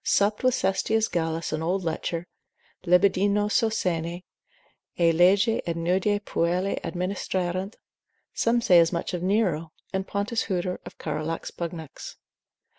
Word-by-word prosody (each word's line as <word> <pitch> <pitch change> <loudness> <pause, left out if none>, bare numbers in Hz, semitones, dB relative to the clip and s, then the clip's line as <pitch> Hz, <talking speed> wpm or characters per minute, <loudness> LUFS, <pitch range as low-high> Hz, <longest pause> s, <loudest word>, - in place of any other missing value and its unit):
supped 205 +3 +2
with 255 -1 +4
Sestius 215 +3 +1
Gallus 165 -1 -2
an 155 - -2
old 180 +4 -1
lecher, 165 +1 -3 0.6
libidinoso 200 +4 +3
sene, 175 -4 -2 0.8
ea 170 -1 +5
lege 195 +6 +4
ut 170 - -1
nudae 185 +5 +1
puellae 180 0 -1
administrarent; 185 +1 -2 0.6
some 235 +1 +2
say 180 -6 +6
as 165 -1 +4
much 170 0 -3
of 175 - -2
Nero, 180 -5 0 0.2
and 190 0 -2
Pontus 205 +3 -1
Huter 180 -2 -2
of - - -11
Carolus 155 +1 -4
Pugnax. 165 -3 -7
180 Hz, 125 wpm, -26 LUFS, 170-200 Hz, 0.8 s, say